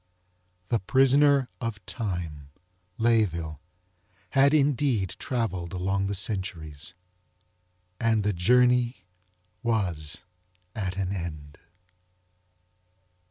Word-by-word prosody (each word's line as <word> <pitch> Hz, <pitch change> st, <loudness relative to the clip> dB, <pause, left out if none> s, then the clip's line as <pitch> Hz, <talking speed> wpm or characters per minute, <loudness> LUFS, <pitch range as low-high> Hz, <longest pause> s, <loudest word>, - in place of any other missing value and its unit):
The 115 Hz, -, +2 dB
Prisoner 135 Hz, +4 st, +4 dB
Of 105 Hz, -5 st, -4 dB
Time, 85 Hz, -, -4 dB, 0.5 s
Layeville, 90 Hz, -, +1 dB, 0.7 s
had 140 Hz, 0 st, +5 dB
indeed 140 Hz, -, +2 dB
travelled 95 Hz, -9 st, -2 dB
along 95 Hz, +2 st, 0 dB
the 100 Hz, -, -2 dB
centuries. 90 Hz, -6 st, -2 dB, 1.0 s
And 110 Hz, -2 st, +2 dB
the 105 Hz, 0 st, +1 dB
journey 125 Hz, +2 st, +3 dB, 0.6 s
was 90 Hz, -10 st, -1 dB, 0.6 s
at 95 Hz, -3 st, -3 dB
an 95 Hz, 0 st, -1 dB
end. 75 Hz, -5 st, -7 dB
100 Hz, 80 wpm, -27 LUFS, 85-120 Hz, 1.0 s, had